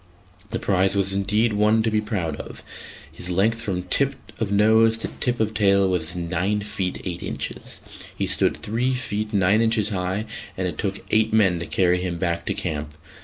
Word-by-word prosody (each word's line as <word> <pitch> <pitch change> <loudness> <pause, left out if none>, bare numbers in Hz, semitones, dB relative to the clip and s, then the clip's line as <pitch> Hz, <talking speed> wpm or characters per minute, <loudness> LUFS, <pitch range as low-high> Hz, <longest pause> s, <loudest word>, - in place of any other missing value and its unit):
The - - -2
prize 95 0 +2
was 95 -1 +2
indeed 105 +3 +1
one 105 +2 +3
to 110 - 0
be 105 0 +2
proud 95 -8 -2
of; - - -8 0.5
his 90 - -8
length 110 +6 +2
from 95 -5 -2
tip 140 +9 +1 0.2
of 110 -3 -1
nose 110 +2 +4
to 115 - -2
tip 120 -1 0
of 110 0 0
tail 100 -2 +4
was 90 -2 0
nine 90 +4 -1
feet 100 -3 -3
eight 90 -2 -4
inches, - - -5 0.4
he - - 0
stood - - +2
three 125 +5 -1
feet 110 -3 -3
nine 100 +2 +3
inches 110 -2 +2
high, 95 +1 -2 0.3
and 95 0 -1
it 90 - -6
took 100 -1 -3
eight 110 0 +3
men 95 -6 +4
to 85 - -5
carry 90 -1 +2
him 90 -2 -2
back 85 -1 -2
to - - -1
camp. 75 -1 -4
100 Hz, 190 wpm, -23 LUFS, 90-110 Hz, 0.5 s, nose